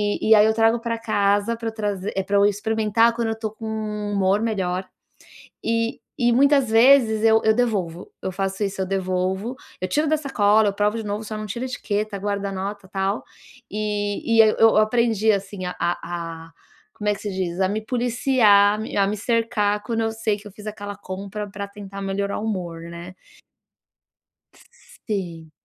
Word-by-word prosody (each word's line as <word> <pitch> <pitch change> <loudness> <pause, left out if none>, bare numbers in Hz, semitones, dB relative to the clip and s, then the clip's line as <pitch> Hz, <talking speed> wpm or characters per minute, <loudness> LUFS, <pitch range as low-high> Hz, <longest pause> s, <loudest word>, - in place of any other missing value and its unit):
e 205 +1 -1
e - - +10
aí 210 - +6
eu 220 - +2
trago 225 +1 +4
pra 230 -1 -1
casa, 205 +3 +2
pra 230 0 -4
eu 220 - -6
traz 205 -2 -1 0.3
pra 200 0 +1
eu 200 - +5
experimentar 220 +1 +2
quando 230 -1 -1
eu 220 - -6
tô 220 - +1
com 225 - -7
um 210 -1 -3
humor 195 0 +2
melhor, 185 -3 -1 0.8
e 230 0 0 0.2
e - - +4
muitas 280 -1 +5
vezes 235 -4 +5
eu 220 - +6
eu 220 - +6
devolvo. 180 -8 -1 0.2
Eu 190 - -1
faço 195 +1 -1
isso, 195 -1 -3
eu - - 0
devolvo, 190 +5 -1 0.3
eu 185 - +1
tiro 305 +1 +2
da 310 +1 +2
sacola, 210 -5 +3
eu 200 - -4
provo 210 +2 +2
de - - -5
novo, 210 +2 -3
só 215 - -4
não 215 - -5
tiro 235 +5 -4
a - - -3
etiqueta, 210 -3 -2
guardo 200 0 -2
a 200 - -2
nota, 200 -1 -5
tal, 195 +1 +1 0.6
e 205 -1 -2
e - - +5 0.2
eu 225 -1 +6
aprendi, 220 -2 +2
assim, 195 -1 -10
a 180 - -4 0.4
a 165 -1 -6 0.4
como 210 0 -2
é - - +3
que - - -12
se 205 - -2
diz? 175 -1 -2
A 190 - +3
me 220 - -2
policiar, 240 -4 +4
a - - -6
me 220 - -6 0.2
me 210 - -4
cercar 225 -2 +1
quando 230 0 -1
eu 225 - -1
sei 215 - +3
que 210 - -12
eu - - -11
fiz 210 0 -9
aquela 205 -1 -6
compra 200 +2 -5
pra 200 0 -5
tentar 200 -1 -9
melhorar 200 +1 -2
o 215 - -4
humor, 175 -5 -4 0.2
né. 175 +2 -9 1.9
Sim. 170 -7 -4
210 Hz, 195 wpm, -23 LUFS, 195-225 Hz, 1.9 s, e